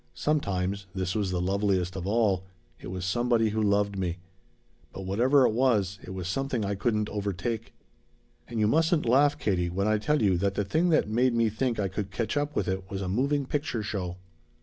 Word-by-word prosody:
Sometimes 100 Hz, -9 st, -1 dB
this 95 Hz, -1 st, -1 dB
was 105 Hz, -3 st, 0 dB
the 90 Hz, -1 st, -1 dB
loveliest 95 Hz, -1 st, 0 dB
of 95 Hz, -1 st, -4 dB
all 100 Hz, -4 st, +2 dB, 0.4 s
it -, -, -9 dB
was 90 Hz, 0 st, -4 dB
somebody 115 Hz, +2 st, +2 dB
who 110 Hz, +1 st, -1 dB
loved 100 Hz, -1 st, +1 dB
me. 90 Hz, -2 st, -2 dB, 0.7 s
But 95 Hz, -, -7 dB
whatever 125 Hz, +8 st, +4 dB
it -, -, +3 dB
was, 110 Hz, -6 st, +1 dB
it -, -, -10 dB
was 95 Hz, -2 st, -5 dB
something 125 Hz, +1 st, -1 dB
I 100 Hz, -, -1 dB
couldn't 105 Hz, +1 st, 0 dB
overtake. 105 Hz, +2 st, -3 dB, 0.7 s
"And 115 Hz, -1 st, -4 dB
you 105 Hz, -, +3 dB
mustn't 160 Hz, -, +2 dB
laugh, 140 Hz, +5 st, +4 dB
Katie, 90 Hz, -4 st, 0 dB
when 100 Hz, +4 st, -1 dB
I 110 Hz, 0 st, +2 dB
tell 150 Hz, +7 st, +1 dB
you 95 Hz, -3 st, +3 dB
that 100 Hz, +1 st, 0 dB
the 105 Hz, -, 0 dB
thing 160 Hz, -, +1 dB
that 155 Hz, -, +3 dB
made 120 Hz, +3 st, +2 dB
me 115 Hz, -1 st, +3 dB
think 115 Hz, +1 st, -1 dB
I 100 Hz, -, +1 dB
could 95 Hz, +1 st, -4 dB
catch 115 Hz, +1 st, -2 dB
up 145 Hz, 0 st, -1 dB
with -, -, 0 dB
it 95 Hz, 0 st, -3 dB
was 100 Hz, -1 st, -4 dB
a -, -, -3 dB
moving 140 Hz, +8 st, +1 dB
picture 140 Hz, -5 st, -2 dB
show! 90 Hz, -4 st, -4 dB
105 Hz, 205 wpm, -28 LUFS, 95-120 Hz, 0.7 s, whatever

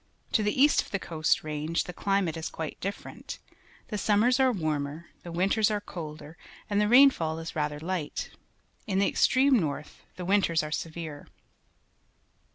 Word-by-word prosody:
To 220 Hz, -, +3 dB
the 210 Hz, +4 st, 0 dB
east 290 Hz, +2 st, +5 dB
of -, -, -12 dB
the 200 Hz, -, -1 dB
Coast 160 Hz, -4 st, 0 dB
Range 155 Hz, +2 st, -2 dB
the 180 Hz, -, -8 dB
climate 195 Hz, -3 st, 0 dB
is 160 Hz, 0 st, -4 dB
quite 160 Hz, -2 st, -6 dB
different. 200 Hz, +2 st, -6 dB, 0.5 s
The 210 Hz, -, -3 dB
summers 220 Hz, +6 st, +3 dB
are 260 Hz, -1 st, +5 dB
warmer, 155 Hz, -4 st, -3 dB
the 175 Hz, -, -8 dB
winters 195 Hz, +5 st, +2 dB
are 210 Hz, -1 st, 0 dB
colder, 160 Hz, -4 st, -8 dB, 0.3 s
and 205 Hz, 0 st, +3 dB
the 210 Hz, -, +2 dB
rainfall 235 Hz, -, +5 dB
is 165 Hz, 0 st, -7 dB
rather 150 Hz, -1 st, -1 dB
light. 170 Hz, -1 st, -4 dB, 0.6 s
In 190 Hz, -3 st, 0 dB
the 200 Hz, -, +3 dB
extreme 260 Hz, -1 st, +4 dB
north 150 Hz, -3 st, -4 dB
the 180 Hz, -, -6 dB
winters 185 Hz, -4 st, +2 dB
are 150 Hz, -, -5 dB
severe. 155 Hz, -2 st, -5 dB
175 Hz, 165 wpm, -28 LUFS, 155-205 Hz, 0.6 s, east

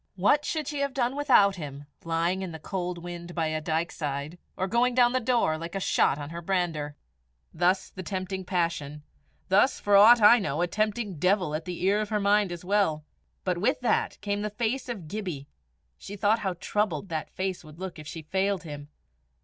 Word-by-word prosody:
what 210 Hz, +11 st, +3 dB
should 310 Hz, -3 st, -2 dB
she 295 Hz, -1 st, -3 dB
have 280 Hz, -1 st, -1 dB
done 250 Hz, 0 st, 0 dB
without 225 Hz, -9 st, +4 dB
him, 145 Hz, -3 st, -7 dB, 0.2 s
lying 170 Hz, +3 st, 0 dB
in 185 Hz, -2 st, -4 dB
the 160 Hz, -, -7 dB
cold 180 Hz, +2 st, -4 dB
wind 175 Hz, 0 st, -8 dB
by 165 Hz, -2 st, 0 dB
a 155 Hz, 0 st, -2 dB
dykeside, 155 Hz, -1 st, -3 dB, 0.2 s
or 190 Hz, -, 0 dB
going 240 Hz, +5 st, +2 dB
down 245 Hz, -1 st, +5 dB
the 255 Hz, -, +2 dB
Daur 230 Hz, -10 st, +1 dB
like 170 Hz, +2 st, -7 dB
a -, -, 0 dB
shot 140 Hz, -, +2 dB
on 145 Hz, 0 st, -7 dB
her 170 Hz, 0 st, -6 dB
brander? 165 Hz, -5 st, -1 dB, 0.6 s
Thus 180 Hz, +3 st, +1 dB
the 185 Hz, -, -7 dB
tempting 190 Hz, 0 st, -4 dB
passion; 165 Hz, -5 st, -2 dB, 0.5 s
thus, 205 Hz, +8 st, +4 dB
for 205 Hz, -1 st, +2 dB
aught 225 Hz, +4 st, +8 dB
I 225 Hz, +3 st, +8 dB
know, 170 Hz, -5 st, -1 dB
a -, -, +3 dB
tempting 210 Hz, -1 st, -2 dB
devil 180 Hz, -2 st, +2 dB
at 155 Hz, +1 st, -3 dB
the 180 Hz, -1 st, -5 dB
ear 200 Hz, +3 st, +3 dB
of 210 Hz, -, -4 dB
her 215 Hz, -1 st, 0 dB
mind 205 Hz, -1 st, +3 dB
as 175 Hz, 0 st, -7 dB
well. 180 Hz, -6 st, +1 dB, 0.4 s
But 180 Hz, -2 st, -1 dB
with 220 Hz, +8 st, +1 dB
that 245 Hz, -, 0 dB
came 205 Hz, 0 st, -2 dB
the 210 Hz, -, -2 dB
face 235 Hz, +5 st, -2 dB
of 200 Hz, -10 st, -5 dB
Gibbie; 175 Hz, -7 st, -5 dB, 0.5 s
she 205 Hz, -, -8 dB
thought 205 Hz, +3 st, +2 dB
how 190 Hz, -4 st, -2 dB
troubled 190 Hz, -1 st, -1 dB
that 160 Hz, -2 st, -3 dB
face 185 Hz, -1 st, -3 dB
would 155 Hz, 0 st, -14 dB
look 185 Hz, -3 st, -6 dB
if 150 Hz, -, -10 dB
she 160 Hz, 0 st, -7 dB
failed 190 Hz, +3 st, 0 dB
him. 145 Hz, -2 st, -8 dB
185 Hz, 205 wpm, -27 LUFS, 165-210 Hz, 0.6 s, aught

